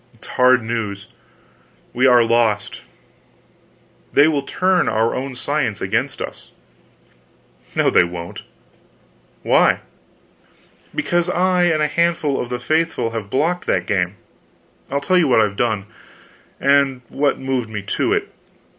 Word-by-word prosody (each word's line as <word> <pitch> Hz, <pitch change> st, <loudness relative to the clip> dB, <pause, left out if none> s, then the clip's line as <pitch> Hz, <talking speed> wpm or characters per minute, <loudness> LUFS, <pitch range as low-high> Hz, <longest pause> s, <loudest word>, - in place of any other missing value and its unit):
"It's -, -, -14 dB
hard 125 Hz, -1 st, +4 dB
news. 110 Hz, -3 st, -4 dB, 0.9 s
We 130 Hz, +2 st, +3 dB
are 120 Hz, -2 st, +6 dB
lost. 115 Hz, -3 st, 0 dB, 1.3 s
They 145 Hz, +2 st, +6 dB
will 150 Hz, -3 st, +1 dB
turn 185 Hz, +5 st, +1 dB
our 110 Hz, +1 st, +1 dB
own 130 Hz, 0 st, -4 dB
science 140 Hz, -5 st, -2 dB
against -, -, -2 dB
us." -, -, -10 dB, 1.3 s
"No -, -, +2 dB
they -, -, +5 dB
won't." 85 Hz, 0 st, -7 dB, 1.0 s
"Why?" -, -, +3 dB, 1.1 s
"Because 175 Hz, 0 st, 0 dB
I 180 Hz, 0 st, +2 dB
and 155 Hz, -3 st, +2 dB
a -, -, +2 dB
handful 165 Hz, -3 st, 0 dB
of 120 Hz, -, -6 dB
the 125 Hz, -, -2 dB
faithful 155 Hz, -4 st, 0 dB
have 110 Hz, -3 st, -5 dB
blocked 165 Hz, -, -1 dB
that -, -, +1 dB
game. 95 Hz, -1 st, -1 dB, 0.7 s
I'll 140 Hz, +1 st, -1 dB
tell 185 Hz, +5 st, +2 dB
you 165 Hz, -, +3 dB
what 125 Hz, -, +4 dB
I've 105 Hz, -2 st, 0 dB
done, 110 Hz, -3 st, -1 dB, 0.7 s
and 140 Hz, -2 st, +2 dB
what 140 Hz, -1 st, 0 dB
moved 130 Hz, -4 st, -2 dB
me 105 Hz, -2 st, -5 dB
to 100 Hz, -, -1 dB
it. -, -, -1 dB
130 Hz, 135 wpm, -19 LUFS, 110-155 Hz, 1.3 s, are